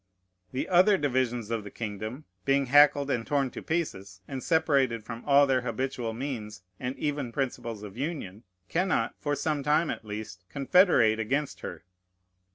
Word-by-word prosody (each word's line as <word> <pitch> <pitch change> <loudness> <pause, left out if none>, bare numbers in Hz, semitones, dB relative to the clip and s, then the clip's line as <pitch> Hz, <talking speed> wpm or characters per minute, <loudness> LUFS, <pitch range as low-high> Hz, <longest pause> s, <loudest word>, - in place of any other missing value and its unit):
The 130 - -2
other 185 +3 +5
divisions 125 - 0
of 115 -2 -1
the 100 - -8
kingdom, 110 +6 -6 0.2
being 140 +3 +2
hackled 145 +1 +5
and 120 -3 0
torn 140 0 0
to - - -7
pieces, 100 - -3
and 135 -2 -5
separated 140 -8 +2
from 115 +1 -7
all 140 0 +6
their 130 -2 +2
habitual 125 -1 -2
means 110 -5 -5 0.2
and 125 +2 -4
even 145 -5 -2
principles 120 -5 -3
of 100 -2 -9
union, 130 - -4 0.3
cannot, 185 - 0
for 145 -1 -1
some 150 -1 -1
time 150 +3 +2
at - - -6
least, 105 -3 -7
confederate 140 - +4
against 135 +6 -1
her. - - -7
130 Hz, 160 wpm, -28 LUFS, 115-145 Hz, 0.3 s, all